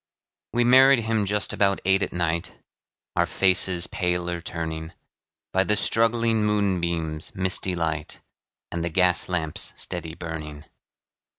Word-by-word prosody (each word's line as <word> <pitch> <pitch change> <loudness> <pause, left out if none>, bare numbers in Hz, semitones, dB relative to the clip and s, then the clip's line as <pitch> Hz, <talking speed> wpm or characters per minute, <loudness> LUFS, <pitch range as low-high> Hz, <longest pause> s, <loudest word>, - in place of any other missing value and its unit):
We 120 - +3
married 130 +1 +6
him 110 -2 0
just 105 0 0
about 100 -1 +2
eight 95 +1 +3
at - - -1
night, 85 -1 -2 0.6
Our - - +2
faces 90 -2 +2
paler 90 -1 -2
turning, 80 -1 -5 0.6
By 95 - +4
the 105 - +2
struggling 115 0 +2
moonbeam's 85 -7 -1
misty 95 0 -1
light, 80 -3 -3 0.5
And 85 -1 -3
the 85 - -1
gas 90 +2 +2
lamp's 80 -4 -1
steady 85 -2 -3
burning. 80 -3 -7
90 Hz, 125 wpm, -24 LUFS, 85-105 Hz, 0.6 s, married